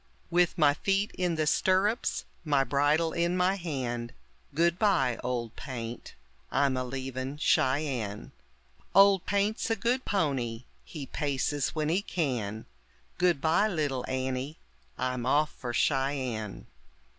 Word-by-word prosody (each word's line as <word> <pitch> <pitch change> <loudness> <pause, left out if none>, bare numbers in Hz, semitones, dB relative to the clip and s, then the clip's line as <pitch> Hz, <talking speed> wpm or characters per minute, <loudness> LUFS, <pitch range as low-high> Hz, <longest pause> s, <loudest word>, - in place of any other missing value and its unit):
With 175 +1 +3
my 150 -3 +5
feet 195 +6 0
in 180 -2 0
the 155 -1 0
stirrups, 190 - +1 0.2
my 145 -4 +3
bridle 145 +5 +2
in 170 +1 +1
my 180 +1 +3
hand; 130 -10 -4 0.4
Goodbye, 170 - +2
Old 120 -2 -3
Paint, 120 -3 -7 0.3
I'm 140 -2 +2
a 130 - -1
leavin' 130 +1 -4
Cheyenne. 130 -8 0 0.6
Old 195 -1 +6
Paint's 205 +3 0
a 225 - +2
good 240 +5 0
pony, 130 - -1 0.2
he 150 -5 -7
paces 145 0 -1
when 155 -1 0
he 180 +5 +2
can; 120 - -2 0.5
Goodbye, 175 +2 +3
little 145 -9 -1
Annie, 130 +3 -2 0.4
I'm 125 -1 -2
off 150 +3 +3
for 125 - -6
Cheyenne. 130 -5 -1
145 Hz, 120 wpm, -29 LUFS, 130-175 Hz, 0.6 s, Old